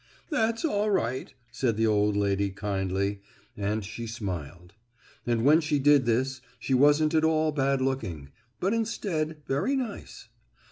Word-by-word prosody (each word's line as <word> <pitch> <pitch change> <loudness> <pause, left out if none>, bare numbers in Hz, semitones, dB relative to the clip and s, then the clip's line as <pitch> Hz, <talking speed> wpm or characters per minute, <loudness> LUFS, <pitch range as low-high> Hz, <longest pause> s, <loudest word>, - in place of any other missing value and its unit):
"That's 230 -2 +1
all 210 -8 +1
right," 130 - -1 0.2
said 120 -3 -1
the 115 - +2
old 105 -1 +2
lady 100 0 +1
kindly, 100 0 -2 0.3
and 105 +1 -2
she 110 +3 -6
smiled. 90 - -6 0.5
And 120 0 +1
when 155 +4 +6
she 150 -1 0
did 140 -2 +4
this 130 +3 0 0.2
she 135 - -2
wasn't 145 +4 +4
at 160 -1 +3
all 160 -1 +2
bad 135 -2 +1
looking, 90 - -3 0.3
but 195 +4 +1
instead, 165 -9 -2
very 145 - 0
nice. 250 -6 -5
130 Hz, 145 wpm, -27 LUFS, 105-155 Hz, 0.5 s, when